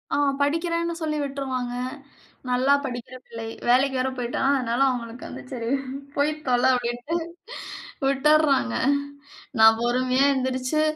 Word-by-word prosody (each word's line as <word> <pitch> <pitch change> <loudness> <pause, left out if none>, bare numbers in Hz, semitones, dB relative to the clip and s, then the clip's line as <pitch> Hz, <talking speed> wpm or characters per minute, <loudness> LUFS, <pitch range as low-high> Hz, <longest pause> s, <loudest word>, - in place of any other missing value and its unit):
ஆ, - - +1 0.2
படிக்கிறேன்னு 335 +3 0
சொல்லி 305 -1 -1
விட்ருவாங்க. 260 -3 -3 0.8
நல்லா 255 +3 +3
படிக்கிற 245 0 -6
பிள்ளை. 230 -1 -7 0.2
வேலைக்கு 265 +2 +4
வேற 260 - +1
போயிட்டா, 245 -1 -2 0.2
அதனால, 240 -1 -1
அவுங்களுக்கு 240 -1 -5
வந்து - - -8
"சரி 230 -2 -3 0.5
போய் 285 +2 +2 0.2
தொல!" 245 -1 +2
அப்பிடின்ட்டு 245 +5 -3 0.9
விட்டர்றாங்க 275 - +3 0.9
நான் 220 0 +8
பொறுமையா 255 +2 +2
எந்திரிச்சு, 260 +3 0
255 Hz, 115 wpm, -24 LUFS, 245-280 Hz, 0.9 s, நான்